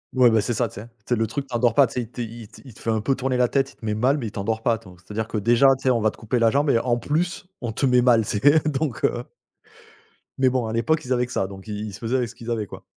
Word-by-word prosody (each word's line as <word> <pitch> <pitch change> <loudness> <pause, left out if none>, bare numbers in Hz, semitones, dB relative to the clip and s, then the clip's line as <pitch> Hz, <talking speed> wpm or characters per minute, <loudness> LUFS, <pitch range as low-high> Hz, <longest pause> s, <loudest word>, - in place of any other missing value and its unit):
Ouais, 125 -2 +6
bah, 110 - +3
c'est 115 +2 -2
ça, 120 - +1
tu - - -15
sais! 115 - -11
Tu 115 - -26 0.2
sais 125 - +3
le 110 -1 0
truc 135 +6 -4
t'endort 120 -3 +1
pas, 140 - +7
tu 115 - -8
sais, 125 - -1
il 115 - -8
te 120 - -7 0.4
il 130 - -12
te - - -17
fait - - -4
un 110 -1 +2
peu 135 +6 +1
tourner 130 -1 -1
la 125 - +3
tête. 135 +2 0
Il - - -30
te - - -12
met 105 - 0
mal 130 +7 +2
mais 130 - -4
il 105 - -7
t'endors 110 +2 -3
pas, 115 - +3
attends. 105 -5 -8
C'est 90 +4 -16
à - - -6
dire 110 +1 -2
que 110 - -3
déjà, 120 +6 +4
tu - - -16
sais, 130 - +3
on 120 -2 +1
va 110 - +3
te - - -12
couper 120 +2 -1
la 115 -1 +4
jambe 140 +3 +2
et 115 - +3
en 120 0 0
plus 160 +10 -2 0.2
on 120 -3 -3
te 125 - -1
met 125 -1 +4
mal, 120 -3 +4
c'est 145 +11 +3
donc 135 -4 -2
heu, 120 - -1 1.1
Mais 130 -1 +4
bon 125 -3 -1
à 110 - -4
l'époque 155 +7 +1
ils 130 - 0
avaient 125 0 +1
que 125 - -13
ça 95 - -1
donc 95 0 -11
ils 105 0 -4
ils 100 - -8
se - - -9
faisaient 120 +3 -1
avec 125 -3 -1
ce - - -13
qu'ils 120 0 -6
avaient, 110 -3 -2
quoi. - - -11
120 Hz, 340 wpm, -23 LUFS, 110-130 Hz, 1.1 s, pas